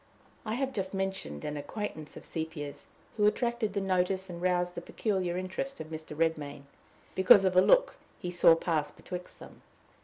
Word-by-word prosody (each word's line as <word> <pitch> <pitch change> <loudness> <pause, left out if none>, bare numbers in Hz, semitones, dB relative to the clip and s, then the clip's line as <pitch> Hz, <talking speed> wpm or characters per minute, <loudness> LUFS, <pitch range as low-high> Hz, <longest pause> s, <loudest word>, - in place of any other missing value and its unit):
I 215 - -1
have 270 +1 -1
just 195 -3 -2
mentioned 190 - -3
an 150 0 -3
acquaintance 155 -1 -5
of - - -11
Sepia's, 160 -3 -5 0.3
who 210 -1 +5
attracted 235 -1 0
the 200 - 0
notice 190 0 0
and 170 0 -7
roused 180 -1 +1
the 170 - -5
peculiar 185 -2 -1
interest 190 +9 -4
of 160 0 -7
Mr. 155 -1 -7
Redmain, 150 -3 -1 0.5
because 190 +1 +7
of 185 -1 +2
a 185 - +8
look - - +4 0.2
he 180 - -4
saw 175 -2 +6
pass 160 -3 0
betwixt 180 0 -8
them. - - -13
180 Hz, 175 wpm, -30 LUFS, 160-195 Hz, 0.5 s, a